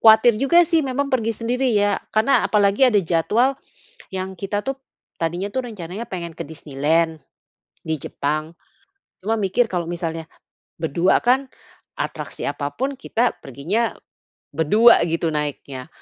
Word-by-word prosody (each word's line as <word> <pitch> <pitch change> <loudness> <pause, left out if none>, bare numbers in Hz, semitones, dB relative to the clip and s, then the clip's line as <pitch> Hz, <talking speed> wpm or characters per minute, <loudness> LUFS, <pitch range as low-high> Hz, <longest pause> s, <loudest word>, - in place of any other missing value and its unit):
kuatir 220 0 +7
juga 340 +7 +5
sih 330 -2 +3
memang 275 +2 -1
pergi 230 -3 +1
sendiri 245 +2 0
ya, 205 -1 +2 0.2
karena 220 +6 +3
apalagi 205 +4 +4
ada 210 -4 +3
jadwal 215 +11 +2 0.6
yang 190 0 -4
kita 205 +1 -2
tuh 270 - 0 0.5
tadinya 175 +4 -1
itu 260 - -3
rencananya 200 -2 -6
pengen 170 -3 -5
ke - - -4
Disneyland 160 +1 -1 0.6
di 160 -1 -1
Jepang. 155 +3 -2 0.7
Cuma 220 +3 0
mikir, 215 +5 +2
kalau 175 -2 -1
misalnya 165 -2 -4 0.6
berdua 170 +4 +2
kan 260 +3 +3 0.5
atraksi - - -5
apa 145 0 -4
pun 270 +2 -2
kita 240 -1 0
perginya 170 - -1 0.6
berdua 210 +11 +5
gitu 165 0 0
naiknya. 140 -3 -4
195 Hz, 135 wpm, -22 LUFS, 160-235 Hz, 0.7 s, kuatir